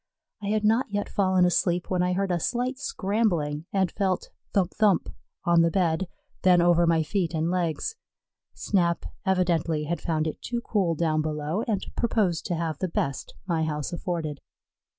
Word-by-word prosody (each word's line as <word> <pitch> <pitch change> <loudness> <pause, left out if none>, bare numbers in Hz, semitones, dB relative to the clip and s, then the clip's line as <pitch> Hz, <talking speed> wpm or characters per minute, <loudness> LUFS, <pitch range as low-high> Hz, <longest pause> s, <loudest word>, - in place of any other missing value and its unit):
I 200 - -4
had 215 +1 +1
not 225 +4 +3
yet 205 0 -2
fallen 185 -2 +3
asleep 180 0 +1
when 180 -1 +2
I 180 0 +1
heard 195 0 0
a 175 - +1
slight 250 - -1
scrambling 185 - -1
and 190 -2 +1
felt 190 -3 -1 0.2
"thump 190 -3 +1
thump" 205 -5 +2 0.4
on 170 -1 +5
the 165 - +4
bed, 175 0 +1 0.3
then 180 -1 +5
over 175 0 +4
my 165 -1 +3
feet 170 0 -1
and 160 +2 0
legs; 180 - -1 0.6
Snap 170 -4 +1 0.2
evidently 170 -4 +1
had 170 +3 -3
found 160 -2 0
it 155 - -4
too 240 -1 -3
cool 190 -8 0
down 155 -1 +1
below, 155 +5 -2
and 205 -4 -1
proposed 210 -8 +1
to 175 - -1
have 160 -3 -2
the 185 - 0
best 140 -5 -3
my 165 -4 0
house 150 +1 -2
afforded. 165 -5 -3
175 Hz, 170 wpm, -26 LUFS, 160-195 Hz, 0.6 s, on